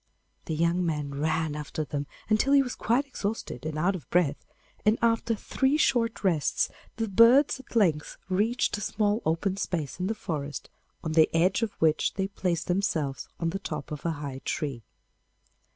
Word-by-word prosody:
The 160 Hz, -, -2 dB
young 170 Hz, +3 st, +2 dB
man 150 Hz, -4 st, -2 dB
ran 155 Hz, +1 st, 0 dB
after 150 Hz, +1 st, -4 dB
them 145 Hz, +1 st, -4 dB, 0.2 s
until 215 Hz, +6 st, +3 dB
he 280 Hz, -1 st, +6 dB
was 250 Hz, -, -4 dB
quite 245 Hz, +5 st, +1 dB
exhausted 205 Hz, -, -4 dB
and 155 Hz, -1 st, -4 dB
out 180 Hz, +5 st, +2 dB
of 160 Hz, -9 st, -9 dB
breath, 165 Hz, -5 st, +1 dB, 0.4 s
and 215 Hz, +2 st, +4 dB
after 230 Hz, 0 st, +2 dB
three 265 Hz, +6 st, +1 dB
short 235 Hz, -7 st, +1 dB
rests 170 Hz, -7 st, +2 dB, 0.3 s
the 225 Hz, 0 st, -1 dB
birds 235 Hz, +8 st, +5 dB
at 265 Hz, -, -14 dB
length 165 Hz, -9 st, +2 dB
reached 210 Hz, +6 st, +1 dB
a -, -, -7 dB
small 210 Hz, +2 st, 0 dB
open 185 Hz, +4 st, 0 dB
space 165 Hz, -6 st, -3 dB
in 180 Hz, -, -1 dB
the 220 Hz, -, -1 dB
forest, 145 Hz, -, -5 dB, 0.3 s
on 160 Hz, -, -2 dB
the 155 Hz, 0 st, +5 dB
edge 180 Hz, +6 st, +3 dB
of 225 Hz, -3 st, -1 dB
which 155 Hz, -1 st, +1 dB
they 195 Hz, 0 st, 0 dB
placed 180 Hz, -4 st, -2 dB
themselves 160 Hz, -8 st, -1 dB
on 165 Hz, -1 st, 0 dB
the 195 Hz, -, -3 dB
top 155 Hz, -7 st, -5 dB
of 150 Hz, -2 st, -5 dB
a 170 Hz, -, 0 dB
high 140 Hz, -3 st, -6 dB
tree. 140 Hz, -6 st, -3 dB
180 Hz, 180 wpm, -28 LUFS, 155-220 Hz, 0.4 s, he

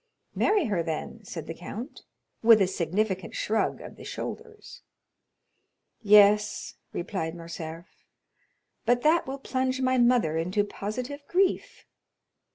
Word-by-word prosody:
"Marry 410 Hz, -5 st, +2 dB
her 200 Hz, -7 st, 0 dB
then," 165 Hz, +7 st, -5 dB
said 165 Hz, -5 st, -7 dB
the 165 Hz, -, -5 dB
count, 220 Hz, -, -8 dB, 0.4 s
with 225 Hz, -1 st, +7 dB
a 195 Hz, -, +4 dB
significant 190 Hz, +1 st, -2 dB
shrug 220 Hz, 0 st, 0 dB
of -, -, -10 dB
the -, -, -11 dB
shoulders. 445 Hz, -1 st, -8 dB, 1.2 s
"Yes," 210 Hz, 0 st, +5 dB, 0.2 s
replied 170 Hz, -2 st, -3 dB
Morcerf, 165 Hz, 0 st, -7 dB, 1.0 s
"but 245 Hz, +1 st, +2 dB
that 315 Hz, -1 st, +3 dB
will 270 Hz, +1 st, -4 dB
plunge 260 Hz, -1 st, -1 dB
my 255 Hz, -1 st, +2 dB
mother 240 Hz, -10 st, +3 dB
into 180 Hz, +5 st, +1 dB
positive 245 Hz, +8 st, -5 dB
grief." 375 Hz, +1 st, 0 dB
210 Hz, 120 wpm, -27 LUFS, 175-255 Hz, 1.2 s, with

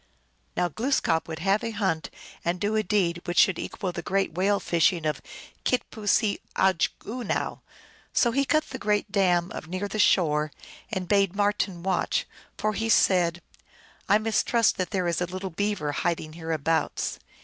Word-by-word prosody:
Now 180 Hz, -, +2 dB
Glooskap 175 Hz, -, 0 dB
would 160 Hz, -1 st, -5 dB
have 195 Hz, +5 st, +1 dB
a 230 Hz, -, -1 dB
hunt 190 Hz, -7 st, -1 dB, 0.3 s
and 175 Hz, +1 st, -1 dB
do 210 Hz, +3 st, 0 dB
a 215 Hz, -, +3 dB
deed 180 Hz, -4 st, 0 dB
which 175 Hz, 0 st, -3 dB
should 185 Hz, -, +5 dB
equal 185 Hz, -, -4 dB
the 175 Hz, -, -5 dB
great 195 Hz, -1 st, 0 dB
whale 195 Hz, +4 st, +2 dB
fishing 170 Hz, 0 st, +2 dB
of 150 Hz, -3 st, -1 dB, 0.4 s
Kit 250 Hz, -, +1 dB
pooseeog 210 Hz, 0 st, +1 dB, 0.6 s
unow. 235 Hz, 0 st, -3 dB, 0.5 s
So 235 Hz, -, +3 dB
he 275 Hz, +4 st, +2 dB
cut 310 Hz, +3 st, +2 dB
the 260 Hz, -, -5 dB
great 210 Hz, -1 st, 0 dB
dam 180 Hz, -3 st, +2 dB, 0.2 s
near 185 Hz, +4 st, -3 dB
the 215 Hz, -, -4 dB
shore, 155 Hz, -6 st, +3 dB, 0.4 s
and 190 Hz, -4 st, -3 dB
bade 200 Hz, -1 st, +2 dB
Marten 205 Hz, -3 st, 0 dB
watch; 190 Hz, -, 0 dB, 0.3 s
for 215 Hz, 0 st, 0 dB
he 225 Hz, +2 st, -2 dB
said, 175 Hz, -5 st, +3 dB, 0.3 s
" -, -, -27 dB
I 205 Hz, -, +6 dB
mis 220 Hz, 0 st, +1 dB
trust 230 Hz, -3 st, +2 dB
that 185 Hz, -, -1 dB
there 185 Hz, -4 st, -1 dB
is 170 Hz, +1 st, 0 dB
a 180 Hz, -, 0 dB
little 185 Hz, +1 st, -5 dB
Beaver 200 Hz, -4 st, -1 dB
hiding 160 Hz, 0 st, -2 dB
hereabouts." 160 Hz, -1 st, -1 dB
190 Hz, 170 wpm, -26 LUFS, 170-210 Hz, 0.6 s, I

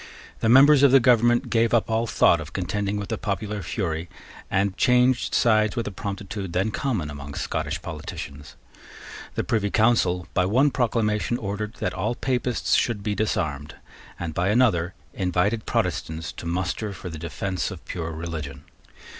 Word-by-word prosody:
The 110 Hz, -, +1 dB
members 135 Hz, +3 st, +7 dB
of 140 Hz, -2 st, +6 dB
the 135 Hz, -, +8 dB
government 120 Hz, -1 st, +3 dB
gave 115 Hz, 0 st, +3 dB
up 115 Hz, -, +2 dB
all 115 Hz, +1 st, 0 dB
thought 85 Hz, -5 st, +4 dB
of 75 Hz, +1 st, -9 dB
contending 100 Hz, +2 st, -2 dB
with 100 Hz, -1 st, -5 dB
the -, -, -2 dB
popular 105 Hz, 0 st, -3 dB
fury, 85 Hz, -3 st, -3 dB, 0.4 s
and 95 Hz, 0 st, +1 dB
changed 125 Hz, +2 st, +3 dB
sides 110 Hz, -2 st, +3 dB
with 115 Hz, -2 st, -2 dB
a -, -, -4 dB
promptitude 100 Hz, -1 st, -5 dB
then 95 Hz, +4 st, +1 dB
common 105 Hz, -, -2 dB
among 70 Hz, 0 st, -8 dB
Scottish -, -, -3 dB
politicians. 70 Hz, 0 st, -7 dB, 0.8 s
The -, -, 0 dB
Privy 110 Hz, -4 st, 0 dB
Council 100 Hz, -6 st, +2 dB
by 90 Hz, -, +2 dB
one 130 Hz, +8 st, +3 dB
proclamation 115 Hz, -2 st, 0 dB
ordered 105 Hz, +2 st, -4 dB
that -, -, -2 dB
all 120 Hz, -, -2 dB
Papists 125 Hz, -2 st, -1 dB
should 110 Hz, -4 st, +1 dB
be 105 Hz, -, -1 dB
disarmed, 75 Hz, -9 st, -2 dB, 0.4 s
and 85 Hz, -2 st, -4 dB
by 90 Hz, +4 st, 0 dB
another 100 Hz, -7 st, +2 dB, 0.2 s
invited 95 Hz, +4 st, 0 dB
Protestants 80 Hz, 0 st, -2 dB
to 85 Hz, -, -8 dB
muster 95 Hz, +4 st, -2 dB
for 90 Hz, -1 st, -8 dB
the 80 Hz, -2 st, -7 dB
defence 85 Hz, +4 st, -3 dB
of 95 Hz, -5 st, -10 dB
pure 80 Hz, -2 st, -4 dB
religion. 80 Hz, -4 st, -6 dB
100 Hz, 165 wpm, -24 LUFS, 85-115 Hz, 0.8 s, the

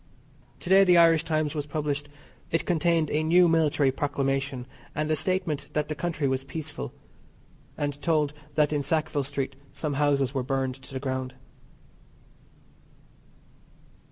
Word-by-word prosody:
To -, -, -6 dB
day 195 Hz, +1 st, +8 dB
the 180 Hz, -2 st, +5 dB
Irish 165 Hz, -2 st, +6 dB
Times 155 Hz, -2 st, 0 dB
was 150 Hz, -2 st, -3 dB
published. 145 Hz, -1 st, -2 dB, 0.4 s
It 165 Hz, -, 0 dB
contained 165 Hz, -2 st, +1 dB
a 150 Hz, -, +1 dB
new 175 Hz, +3 st, +5 dB
military 155 Hz, -4 st, +3 dB
proclamation, 135 Hz, -2 st, -1 dB, 0.3 s
and 150 Hz, +1 st, -1 dB
a -, -, +3 dB
statement 165 Hz, -5 st, 0 dB
that 150 Hz, 0 st, -1 dB
the -, -, -1 dB
country 160 Hz, -2 st, -2 dB
was 130 Hz, 0 st, -1 dB
peaceful, 145 Hz, -, -6 dB, 0.9 s
and 145 Hz, -1 st, -3 dB
told 155 Hz, -3 st, +1 dB, 0.2 s
that 150 Hz, -1 st, +3 dB
in 145 Hz, -, +1 dB
Sackville 155 Hz, -1 st, 0 dB
Street 135 Hz, -1 st, -3 dB, 0.2 s
some 150 Hz, -2 st, -3 dB
houses 140 Hz, -2 st, +1 dB
were 135 Hz, -, 0 dB
burned 130 Hz, 0 st, -1 dB
to 130 Hz, -, -13 dB
the -, -, -1 dB
ground. 130 Hz, -1 st, -3 dB
150 Hz, 145 wpm, -27 LUFS, 140-160 Hz, 0.9 s, day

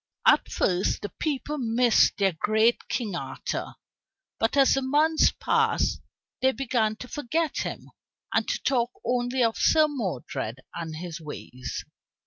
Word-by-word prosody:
At -, -, +5 dB
first 180 Hz, 0 st, 0 dB
the 205 Hz, -, -3 dB
people 300 Hz, 0 st, -2 dB
missed 240 Hz, -1 st, +3 dB
their 195 Hz, -1 st, +3 dB
great 220 Hz, +7 st, +2 dB
King 215 Hz, -7 st, -2 dB
Arthur, -, -, -4 dB, 0.6 s
but 225 Hz, +5 st, +1 dB
as 275 Hz, -1 st, +6 dB
the 270 Hz, -, +1 dB
months 300 Hz, +4 st, +3 dB
passed -, -, +1 dB, 0.4 s
they 265 Hz, -, +4 dB
began 235 Hz, -5 st, 0 dB
to 250 Hz, -, -9 dB
forget 300 Hz, +4 st, -2 dB
him, -, -, -5 dB, 0.4 s
and -, -, +1 dB
to -, -, -1 dB
talk 240 Hz, -3 st, +2 dB, 0.2 s
only 245 Hz, +1 st, +1 dB
of 225 Hz, -1 st, +1 dB
Sir 310 Hz, -1 st, +5 dB
Modred 180 Hz, -, -4 dB
and 165 Hz, -2 st, -5 dB
his 170 Hz, 0 st, -6 dB
ways. 130 Hz, -4 st, -7 dB
235 Hz, 140 wpm, -26 LUFS, 195-270 Hz, 0.6 s, as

